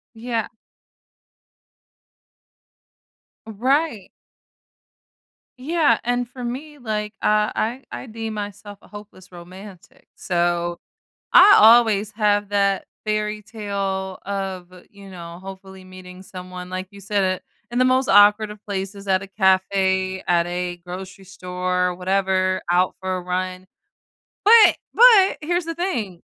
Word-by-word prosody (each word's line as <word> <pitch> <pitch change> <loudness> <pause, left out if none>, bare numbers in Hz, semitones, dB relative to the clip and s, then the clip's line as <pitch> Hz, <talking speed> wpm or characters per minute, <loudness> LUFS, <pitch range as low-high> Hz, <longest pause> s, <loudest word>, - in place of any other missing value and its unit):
Yeah. 230 -1 -3 3.0
Right. 245 - -1 1.5
Yeah, 310 +3 +2
and 245 0 -1
for 250 0 -10
me, 285 +5 -6
like, 215 -3 -4
uh, 210 0 +2
I 240 +5 -3
I - - -7
deem 225 -1 -6
myself 205 0 -7
a - - -19
hopeless 205 -3 -13
romantic, 185 +2 -14
so, 175 -1 -1 0.5
I 400 +3 +8
always 220 -2 +5
have 205 -1 0
that 200 -1 +1 0.2
fairytale 210 -3 -3
of, 190 -2 -5 0.2
you 200 -1 -14
know, 170 -1 -10
hopefully 190 0 -11
meeting 185 0 -12
someone, 180 -1 -9
like 185 0 -5
you 200 - -14
said, 195 -2 -1 0.3
in 240 - -2
the 255 - +4
most 260 +1 +2
awkward 210 +1 +5
of 210 -1 -16
places; 195 0 -6
at 190 0 +2
a - - -8
cafe, 190 -1 +1
at 170 -1 +2
a 175 0 -4
grocery 190 +2 -9
store, 180 -1 -2
whatever, 185 0 0
out 180 +1 +2
for 190 -1 -2
a 185 - -4
run. 185 +1 -4 0.8
But 440 0 +7 0.2
but 445 -5 +6
here's 345 +3 -1
the 330 0 -5
thing, 225 - -3
200 Hz, 120 wpm, -21 LUFS, 185-220 Hz, 3.0 s, I